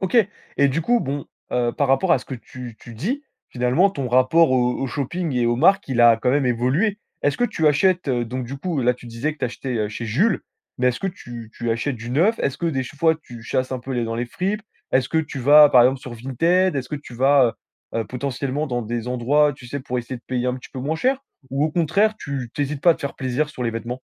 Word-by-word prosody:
OK 190 Hz, +5 st, 0 dB, 0.4 s
et 140 Hz, 0 st, +4 dB
du 140 Hz, +5 st, 0 dB
coup 240 Hz, +7 st, +2 dB
bon, 140 Hz, -3 st, -3 dB, 0.3 s
heu, 120 Hz, -1 st, +1 dB
par 145 Hz, -, 0 dB
rapport 150 Hz, +7 st, +3 dB
à 135 Hz, -, +4 dB
ce -, -, -12 dB
que 135 Hz, -, -6 dB
tu 120 Hz, 0 st, -10 dB
tu 120 Hz, -, -12 dB
dis, 245 Hz, -, -3 dB, 0.2 s
finalement 130 Hz, +11 st, +2 dB
ton 135 Hz, -9 st, -4 dB
rapport 130 Hz, +6 st, +4 dB
au 125 Hz, -1 st, +2 dB
au 135 Hz, -, -2 dB
shopping 155 Hz, +5 st, -3 dB
et 120 Hz, -1 st, +2 dB
aux 120 Hz, 0 st, +2 dB
marques, 195 Hz, +7 st, +4 dB
il 125 Hz, -3 st, +1 dB
a 115 Hz, -1 st, +7 dB
quand 125 Hz, +2 st, 0 dB
même 140 Hz, -1 st, +2 dB
évolué. 135 Hz, -, +1 dB, 0.2 s
Est-ce 145 Hz, -, +1 dB
que 245 Hz, -, +3 dB
tu 160 Hz, -9 st, 0 dB
achètes, 180 Hz, +2 st, +3 dB
heu, 120 Hz, -2 st, +1 dB
donc 125 Hz, +2 st, -4 dB
du 135 Hz, +3 st, -6 dB
coup 165 Hz, -4 st, -2 dB
là 125 Hz, +1 st, +3 dB
tu 120 Hz, -, -14 dB
disais 115 Hz, +7 st, -2 dB
que 155 Hz, -, -17 dB
tu -, -, -1 dB
achetais, 125 Hz, +1 st, -4 dB
heu, 105 Hz, -, 0 dB
chez 105 Hz, +2 st, -6 dB
Jules, 165 Hz, -, +2 dB, 0.4 s
mais 125 Hz, -, +3 dB
est-ce 125 Hz, -, -2 dB
que 195 Hz, -, -1 dB
tu 120 Hz, -, -8 dB
tu 120 Hz, -1 st, -3 dB
achètes 120 Hz, +3 st, -1 dB
du 115 Hz, +1 st, -7 dB
neuf? 185 Hz, -, +2 dB
Est-ce 140 Hz, -, -1 dB
que 170 Hz, -, -1 dB
des 135 Hz, -5 st, 0 dB
ch 135 Hz, +3 st, -10 dB
fois 160 Hz, +1 st, +3 dB
tu 120 Hz, -2 st, -11 dB
chasses 130 Hz, +2 st, -1 dB
un 130 Hz, -, -2 dB
peu 130 Hz, +2 st, -6 dB
les 120 Hz, -, 0 dB
f -, -, -4 dB
dans 115 Hz, -, -3 dB
les 120 Hz, +1 st, -2 dB
fripes? 195 Hz, -, -2 dB, 0.3 s
Est-ce 130 Hz, -1 st, +2 dB
que 160 Hz, -, +1 dB
tu 155 Hz, -3 st, -3 dB
vas, 145 Hz, +3 st, +8 dB
par 125 Hz, -2 st, +7 dB
exemple, 130 Hz, +2 st, +3 dB
sur 130 Hz, -4 st, -8 dB
Vinted? 165 Hz, +9 st, +1 dB
Est-ce 130 Hz, -1 st, -3 dB
que 150 Hz, -, -3 dB
tu 140 Hz, -4 st, -11 dB
vas, 130 Hz, -1 st, +4 dB, 0.4 s
heu -, -, 0 dB
heu, -, -, -2 dB
potentiellement 140 Hz, +4 st, -3 dB
dans 120 Hz, -3 st, -2 dB
des 120 Hz, +2 st, -4 dB
endroits, 145 Hz, +5 st, +2 dB
tu 130 Hz, -, -13 dB
sais, 140 Hz, +3 st, -4 dB
pour 125 Hz, -1 st, -3 dB
essayer 120 Hz, +2 st, -5 dB
de 120 Hz, -, -15 dB
payer 125 Hz, -1 st, -1 dB
un 125 Hz, -, 0 dB
petit 130 Hz, -, -11 dB
peu 135 Hz, -, -6 dB
moins 155 Hz, +4 st, -1 dB
cher? 260 Hz, +7 st, +1 dB, 0.3 s
Ou 135 Hz, +2 st, +1 dB
au 155 Hz, -, 0 dB
contraire, 185 Hz, +7 st, +2 dB
tu 135 Hz, -4 st, -5 dB
tu 145 Hz, -, 0 dB
hésites 140 Hz, 0 st, -4 dB
pas 170 Hz, -, +7 dB
de -, -, -8 dB
te -, -, -12 dB
faire 140 Hz, -, -3 dB
plaisir 130 Hz, +3 st, -1 dB
sur 130 Hz, -5 st, -7 dB
les 115 Hz, -, +1 dB
vêtements? 120 Hz, +3 st, -5 dB
130 Hz, 275 wpm, -22 LUFS, 120-155 Hz, 0.4 s, vas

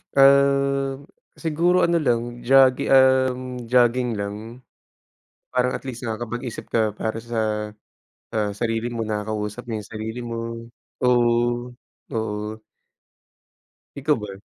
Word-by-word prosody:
Um, 140 Hz, 0 st, +4 dB, 0.3 s
siguro 170 Hz, +3 st, +2 dB
ano 170 Hz, 0 st, +3 dB
lang 120 Hz, -3 st, -1 dB
jogi 135 Hz, 0 st, +5 dB
um, 130 Hz, -1 st, +3 dB
jogging 120 Hz, -1 st, +3 dB
lang. 105 Hz, +5 st, -6 dB, 0.9 s
Parang 125 Hz, 0 st, +1 dB
at -, -, -4 dB
least 120 Hz, -1 st, -6 dB
nakapag-isip 120 Hz, +2 st, -5 dB
ka 110 Hz, -2 st, +1 dB
para 110 Hz, +1 st, -3 dB
sa, 110 Hz, -2 st, -2 dB, 0.6 s
ah, 105 Hz, -1 st, +1 dB
sarili 115 Hz, +1 st, -1 dB
mo, 115 Hz, -1 st, -3 dB
nakakausap 105 Hz, +1 st, -3 dB
mo 110 Hz, -, -1 dB
yung 105 Hz, -, -9 dB
sarili 110 Hz, +2 st, -6 dB
mo. 115 Hz, 0 st, -4 dB, 0.6 s
Oo, 120 Hz, 0 st, +2 dB, 0.4 s
oo. 110 Hz, -1 st, -3 dB, 1.4 s
Ikaw 145 Hz, +2 st, +1 dB
ba? 100 Hz, -2 st, -7 dB
120 Hz, 110 wpm, -23 LUFS, 110-130 Hz, 1.4 s, jogi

